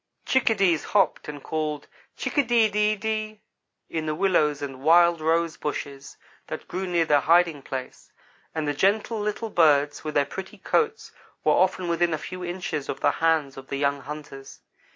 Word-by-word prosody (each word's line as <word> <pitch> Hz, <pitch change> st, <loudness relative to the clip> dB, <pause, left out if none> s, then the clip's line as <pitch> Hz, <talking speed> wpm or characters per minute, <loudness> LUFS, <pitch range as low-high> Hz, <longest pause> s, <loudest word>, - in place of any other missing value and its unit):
Chickadees 195 Hz, -, +2 dB
hopped 195 Hz, -6 st, +1 dB
and 145 Hz, -2 st, -8 dB
called, 155 Hz, -2 st, -3 dB, 0.3 s
"chick -, -, -4 dB
a 285 Hz, -, +4 dB
de 235 Hz, -3 st, +3 dB
de 210 Hz, +1 st, +2 dB
de" 215 Hz, 0 st, -3 dB, 0.5 s
in 160 Hz, -1 st, -4 dB
the 155 Hz, -, -1 dB
willows 155 Hz, -5 st, +2 dB
and 135 Hz, -2 st, -6 dB
wild 170 Hz, +2 st, +5 dB
rose 165 Hz, +1 st, +1 dB
bushes 140 Hz, -2 st, -6 dB, 0.3 s
that -, -, -7 dB
grew 185 Hz, +2 st, -4 dB
near 170 Hz, -2 st, +1 dB
their 150 Hz, -2 st, +4 dB
hiding 165 Hz, 0 st, +3 dB
place; 130 Hz, -1 st, -7 dB, 0.4 s
and 155 Hz, -2 st, -2 dB
the 145 Hz, -, 0 dB
gentle 210 Hz, +7 st, +1 dB
little 210 Hz, +1 st, -3 dB
birds 145 Hz, -4 st, +3 dB
with 155 Hz, -1 st, -5 dB
their 145 Hz, -, +3 dB
pretty 190 Hz, +6 st, -8 dB
coats 450 Hz, -1 st, -1 dB, 0.3 s
were -, -, +4 dB
often 185 Hz, -1 st, +1 dB
within 170 Hz, -1 st, +1 dB
a -, -, -4 dB
few 185 Hz, +4 st, -7 dB
inches 175 Hz, -5 st, -4 dB
of 135 Hz, -, -3 dB
the -, -, +4 dB
hands 160 Hz, -5 st, 0 dB
of 135 Hz, 0 st, -10 dB
the 140 Hz, -, -3 dB
young 140 Hz, 0 st, 0 dB
hunters. 145 Hz, -1 st, -9 dB
165 Hz, 175 wpm, -25 LUFS, 145-190 Hz, 0.5 s, wild